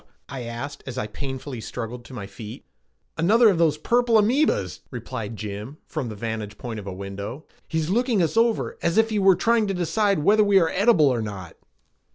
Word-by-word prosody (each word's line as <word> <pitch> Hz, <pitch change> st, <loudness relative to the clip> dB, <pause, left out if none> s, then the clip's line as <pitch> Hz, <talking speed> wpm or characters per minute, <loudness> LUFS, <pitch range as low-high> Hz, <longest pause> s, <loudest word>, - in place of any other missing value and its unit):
I 135 Hz, -2 st, -5 dB
asked 140 Hz, +5 st, -6 dB
as 130 Hz, -1 st, -6 dB
I 125 Hz, -, -1 dB
painfully 130 Hz, +2 st, -6 dB
struggled 120 Hz, +1 st, -6 dB
to 130 Hz, -, -12 dB
my 105 Hz, -, -5 dB
feet. 105 Hz, +4 st, -10 dB, 0.5 s
"Another 220 Hz, +7 st, +5 dB
of 185 Hz, -5 st, +1 dB
those 160 Hz, -3 st, +3 dB
purple 235 Hz, +6 st, +3 dB
amoebas," 215 Hz, -, +2 dB
replied 115 Hz, -2 st, -6 dB
Jim 105 Hz, +7 st, -6 dB
from 140 Hz, -7 st, -4 dB
the 110 Hz, -, -6 dB
vantage 110 Hz, -1 st, -5 dB
point 115 Hz, -3 st, -5 dB
of 100 Hz, -, -9 dB
a -, -, -3 dB
window. 100 Hz, -, -6 dB, 0.2 s
"He's 160 Hz, +1 st, -1 dB
looking 240 Hz, 0 st, +2 dB
us 165 Hz, -, -1 dB
over 230 Hz, 0 st, +1 dB
as 170 Hz, +4 st, 0 dB
if 225 Hz, 0 st, +4 dB
he 215 Hz, -, +1 dB
were 195 Hz, -1 st, +6 dB
trying 225 Hz, +3 st, +2 dB
to 195 Hz, -, -1 dB
decide 195 Hz, 0 st, +1 dB
whether 210 Hz, +5 st, +5 dB
we 200 Hz, -1 st, +5 dB
are 165 Hz, -3 st, +2 dB
edible 195 Hz, -5 st, +4 dB
or 120 Hz, -3 st, 0 dB
not." 100 Hz, -6 st, -7 dB
145 Hz, 200 wpm, -24 LUFS, -, 0.5 s, were